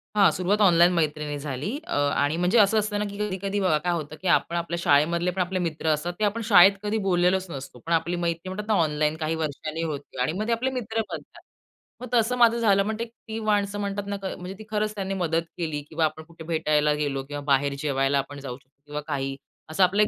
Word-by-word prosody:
हां. 200 -2 +6
सुरवात 195 +4 0
ऑनलाईन 175 -3 +6
मैत्रीनी 150 -3 -1
झाली. 140 +2 -4 0.2
अ, - - -8 0.2
आणि 145 +3 +1
म्हणजे 180 +6 +2
असं 215 +1 +5
असतं 210 0 -1
ना 210 - 0
की 200 - -8
कधी-कधी 200 -1 -2
बघा 185 -6 +3
काय 175 +3 -1
होतं 155 -2 -4
की 190 - -3
आपण 170 0 +2
आपल्या 170 0 -2
शाळेमधले 170 +4 +3
पण 185 +1 -2
आपले 185 +1 -1
मित्र 165 -2 -3
असतात 155 +3 0
ते - - 0
आपण 210 +3 -1
शाळेत 195 -1 +9
कधी 210 +1 0
बोललेलोच 180 0 +2
नसतो. 130 -3 -8
पण 170 - 0
आपली 165 +2 +1
मैत्री 170 +2 -2
म्हणतात 210 +3 -5
ना 220 - +2
ऑनलाईन 150 0 0
काही 160 0 -1
वर्षांनी 155 +1 -4
होते 145 -5 -4
आणि 125 - +1
मग 215 +2 -2
आपले 235 +3 +1
मित्र 225 -1 -2
बनतात. - - -8 0.6
मग 250 - -5
तसं 245 +1 +2
माझं 235 -1 +5
झालं. 200 -4 +3
पण 220 - -1
ती 225 -1 -8
माणसं 205 -2 0
म्हणतात 200 0 -3
ना, 200 - -2 0.2
म्हणजे 180 +1 -7
ती - - -8
खरंच 215 0 -1
त्यांनी 195 -1 -3
मदत 165 -3 0
केली. 155 -4 -2
किंवा 160 0 +1
आपण 160 +1 -3
कुठे 165 0 -13
भेटायला 155 -2 +1
गेलो 145 -2 -2
किंवा 145 +1 -6
बाहेर 140 +1 +3
जेवायला 140 -1 +1
आपण 140 +1 -6
जाऊ 135 -3 -6
शकतो 140 +1 -32
किंवा 150 0 -5
काही. 135 -2 -2 0.3
असा 160 +4 +2
आपला 190 +3 +3
एक 210 - +4
170 Hz, 225 wpm, -25 LUFS, 150-200 Hz, 0.6 s, शाळेत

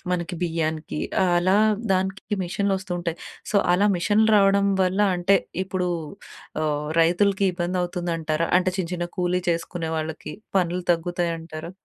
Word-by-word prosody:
మనకి 175 0 -2
బియ్యానికి 160 -3 -2 0.3
ఆలా 180 +2 +3 0.4
దానికి 190 +3 -1
మిషన్‌లొస్తూ 195 0 -1
ఉంటాయి. 170 -1 -3 0.3
సో, 210 - +1 0.2
అలా 195 +3 +3
మిషన్‌లు 210 +5 +2
రావడం 200 0 +4 0.2
వల్ల 185 +2 0 0.2
అంటే 185 +3 +4 0.3
ఇప్పుడూ 180 -1 -2 0.7
ఆహ్, 150 -1 -1
రైతులికి 195 +4 +3
ఇబ్బందవుతుందంటారా? 175 -3 -1
అంటే 185 - 0
చిన్న, 170 -3 -1
చిన్న 175 -1 -2
కూలీ 180 0 +1
చేసుకునే 170 0 -3
వాళ్ళకి 155 0 -5 0.2
పనులు 180 0 +1
తగ్గుతాయంటారా? 165 -1 -2
175 Hz, 120 wpm, -24 LUFS, 165-190 Hz, 0.7 s, రావడం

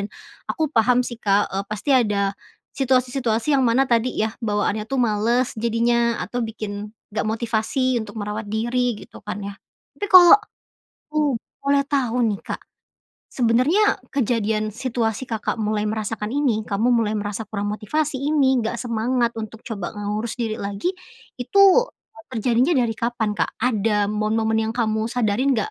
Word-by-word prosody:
dan 200 - -2 0.4
aku 310 -2 -1
paham 245 +1 +3
sih, 240 -1 -7
Kak, 200 0 +2
eee, 195 +1 -2
pasti 215 +6 -3
ada 205 -6 +2 0.4
situasi-situasi 255 -1 +1
yang - - +3
mana 240 +4 +3
tadi 235 0 +1
yah 220 0 0
bawaannya 210 -1 -1
tuh 270 - -2
males 235 +3 +1
jadinya 235 +1 +1
atau 245 - -4
bikin 210 -1 -6 0.2
enggak 215 - -1
motivasi 235 +3 0
untuk 215 0 -8
merawat 210 0 -4
diri, 240 +2 0
gitu - - -14
kan - - -5
yah. 200 0 -6 0.4
Tapi 410 - -2
kalau 365 -4 +9 0.6
aku 305 0 -7 0.4
boleh 280 0 +2
tahu 250 -4 0
nih, 210 -4 0
Kak, - - -6 0.7
sebenernya 255 - +2
kejadian 220 -5 0
situasi 230 -2 -2
Kakak 220 -2 -1
mulai 210 0 0
merasakan 215 +1 -3
ini, 240 -7 0
kamu 220 +4 +1
mulai 225 -3 +2
merasa 210 +1 -3
kurang 205 0 -3
motivasi 275 +7 -2
ini, 275 -2 +2
enggak 230 0 -1
semangat 235 +1 0
untuk 220 +1 -7
coba, 200 -5 -5
ngurus 210 +2 -3
diri 225 -3 -3
lagi, 200 - -2 0.5
itu 395 +11 +3 0.7
terjadinya 245 +7 +2
dari 245 -4 +2
kapan, 230 -3 -1
Kak? - - -1
Ada 210 -3 +1
momen-momen 220 +1 0
yang - - -6
kamu 220 -2 0
sadarin 245 +3 +1
enggak? 215 - -1
225 Hz, 150 wpm, -22 LUFS, 215-250 Hz, 0.7 s, kalau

